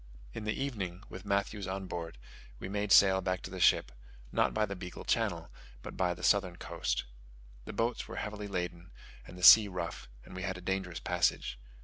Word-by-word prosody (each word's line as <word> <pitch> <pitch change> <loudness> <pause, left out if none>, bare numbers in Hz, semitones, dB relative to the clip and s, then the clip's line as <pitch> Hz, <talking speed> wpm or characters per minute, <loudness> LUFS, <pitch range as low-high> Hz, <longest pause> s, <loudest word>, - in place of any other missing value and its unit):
In 105 - -6
the 110 +4 -2
evening, 100 -9 -4
with 95 +2 -9
Matthews 100 0 -1
on 95 +1 -4
board, 85 -5 -6 0.4
we - - -7
made 100 +1 -2
sail 95 -1 +7
back 95 0 -2
to 95 - -7
the 95 - -6
ship, 85 - +4 0.4
not - - +2
by 110 0 +1
the 100 -1 -6
Beagle 90 -1 -8
Channel, 90 -8 -1 0.3
but - - -8
by 90 -1 0
the 90 - -12
southern 95 -4 +3
coast. - - -2 0.6
The - - -7
boats 115 +4 -1
were - - -8
heavily 105 -1 -5
laden 90 -2 -4 0.4
and 90 - -11
the 90 - -9
sea 105 +2 +10
rough, 90 -3 -5 0.2
and - - -12
we 95 - -5
had 95 0 -3
a - - -9
dangerous 95 -2 -3
passage. 85 -8 0
95 Hz, 200 wpm, -31 LUFS, 90-100 Hz, 0.6 s, sea